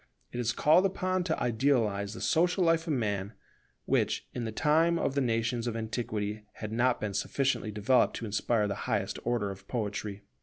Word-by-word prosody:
It 120 - -5
is 120 -1 +1
called 160 +9 +4
upon 185 -1 -1
to 160 - -1
idealize 110 -5 +1
the - - -8
social 180 +2 +2
life 165 0 +2
of 155 - +1
Man, 105 -4 -1 0.5
which, - - 0
in 120 - -3
the 110 - -3
time 160 +7 +3
of 140 - 0
the 140 - +1
nations 115 0 0
of 115 -1 -2
antiquity, 110 -2 -3
had 110 -1 -6
not 120 +2 +2
been 105 -2 -3
sufficiently 130 +3 0
developed 105 +5 +2
to 115 - -4
inspire 105 +1 +1
the 100 - -1 0.2
highest - - -1
order 115 -4 0
of 95 0 -11
poetry. 105 -3 -3
120 Hz, 185 wpm, -30 LUFS, 105-145 Hz, 0.5 s, called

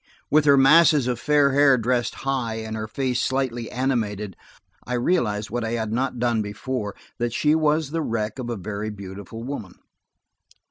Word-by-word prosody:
With 150 0 +4
her 140 -1 +6
masses 150 0 +6
of 125 -1 -1
fair 145 +1 +3
hair 140 -1 +5
dressed 120 +1 0
high, 130 -5 -1
and 110 0 -5
her 110 0 -4
face 125 +2 -1
slightly 130 -3 -1
animated, 110 -7 -2 0.5
I 125 - -5
realized 115 - 0
what 120 0 -2
I 110 +1 -2
had 110 -2 -2
not 130 +1 -1
done 120 -2 +1
before–that 110 +2 -5
she 150 +4 +2
was 155 -1 +1
the 165 +1 -1
wreck 110 -3 -3
of 120 -2 -4
a 120 - -2
very 105 +2 -4
beautiful 100 +2 -8
woman. 120 -8 -6
120 Hz, 170 wpm, -23 LUFS, 110-135 Hz, 0.5 s, her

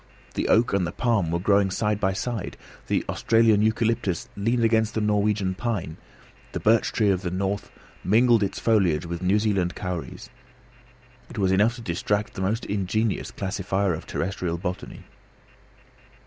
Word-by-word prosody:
The - - -1
oak 115 -1 +3
and 95 -3 +1
the - - -4
palm 115 -9 0
were 85 - 0
growing 100 +2 +3
side 105 +2 -1
by 95 -1 +1
side, 115 +1 -4 0.3
the - - 0
Australian 115 -2 +3
eucalyptus 110 -4 0
leaned 115 +4 0
against 110 -1 +2
the - - +1
Norwegian 105 -2 +1
pine, 95 -7 -3 0.6
the - - -2
birch 110 +1 +3
tree 105 -3 +2
of 95 -1 0
the 90 - -2
north 95 +2 -2 0.3
mingled 115 +3 +4
its 100 -1 -1
foliage 95 -8 +2
with 85 +1 -5
New 95 +3 +3
Zealand 100 -5 0
kauris. 90 -3 -6 1.0
It - - -10
was 95 -2 +2
enough 105 +5 +3
to 120 - -9
distract 105 +2 -1
the - - -6
most 105 +5 -1
ingenious 105 +2 -1
classifier 95 -1 -1
of 80 - -7
terrestrial 90 -2 -2
botany. 90 +1 -6
100 Hz, 160 wpm, -25 LUFS, 95-110 Hz, 1.0 s, mingled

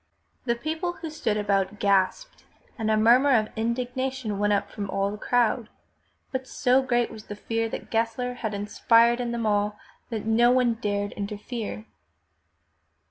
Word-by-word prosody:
'' - - -43
The 235 -2 +1
people 315 +7 -3
who 330 -3 -7
stood 220 -8 -1
about 200 -1 0
gasped, 200 - 0 0.3
and 220 -3 -2
a 215 - +3
murmur 250 +5 +5
of 215 -1 0
indigna 245 +3 -1
tion 225 -6 -4
went 205 0 +2
up 200 - 0
from 200 -2 -5
all 195 +1 0
the 210 - -6
crowd, 240 -1 +1 0.6
but 260 -1 -3
so 255 +2 +2
great 240 -2 0
was 215 0 -10
the 205 - -7
fear 225 +2 -2
that - - -7
Gessler 230 +2 0
had 220 -4 -3
inspired 230 +3 +3
in 240 -1 -2
them 235 -1 -2
all 205 0 +1 0.3
that 220 -3 -4
no 230 +2 +4
one 250 -1 +3
dared 205 -3 -2
interfere. 210 +2 -5
225 Hz, 170 wpm, -26 LUFS, 210-245 Hz, 0.6 s, murmur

